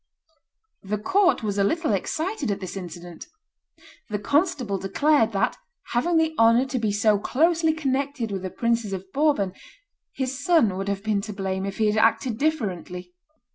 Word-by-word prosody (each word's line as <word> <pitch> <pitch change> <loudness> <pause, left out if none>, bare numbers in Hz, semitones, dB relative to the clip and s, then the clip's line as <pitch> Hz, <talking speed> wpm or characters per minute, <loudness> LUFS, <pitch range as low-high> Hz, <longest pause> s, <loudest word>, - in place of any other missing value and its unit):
The 205 +2 -3
court 365 - +2
was 205 -1 -1
a - - +4
little 310 - +1
excited 320 - -2
at 200 -1 -1
this 185 -1 -6
incident. 175 -2 -8 0.8
The 210 - -1
constable 255 - 0
declared 230 +5 +2
that, 195 - 0 0.3
having 330 +8 +1
the 320 0 +2
honor 230 +3 +5
to 260 -1 -2
be 220 -2 0
so 205 0 +2
closely 325 +8 +2
connected 275 -5 -2
with 195 -2 -3
the 185 - -4
princes 230 -1 -1
of 190 0 -6
Bourbon, 280 -11 +1 0.6
his 265 +1 -4
son 285 - +3
would 195 +1 -4
have 200 0 -2
been 215 -2 0
to 210 +1 -6
blame 190 0 -3
if 195 - -5
he 220 - +2
had 210 0 +1
acted 230 +1 +1
differently. 185 - -2
220 Hz, 170 wpm, -24 LUFS, 195-285 Hz, 0.8 s, honor